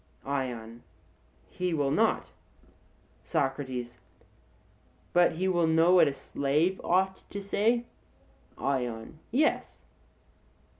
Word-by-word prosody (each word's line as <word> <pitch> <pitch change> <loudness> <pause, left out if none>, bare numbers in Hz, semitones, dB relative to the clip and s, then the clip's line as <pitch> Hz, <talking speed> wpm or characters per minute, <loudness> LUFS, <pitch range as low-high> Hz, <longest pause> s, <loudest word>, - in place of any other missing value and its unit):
ION: 120 -4 -4 0.7
He 180 -2 -2
will 140 -2 +1
not. - - +1 0.9
SOCRATES: 130 -3 -2 1.1
But 175 0 +5
he 185 +4 -1
will 175 -3 +2
know 165 +2 +4
what 180 - +7
a 140 - 0
slave 150 +7 0
ought 190 +2 +1
to 200 - -5
say? 220 +4 +1 0.7
ION: 125 +1 -3
Yes. 295 +6 0
160 Hz, 95 wpm, -29 LUFS, 130-185 Hz, 1.1 s, what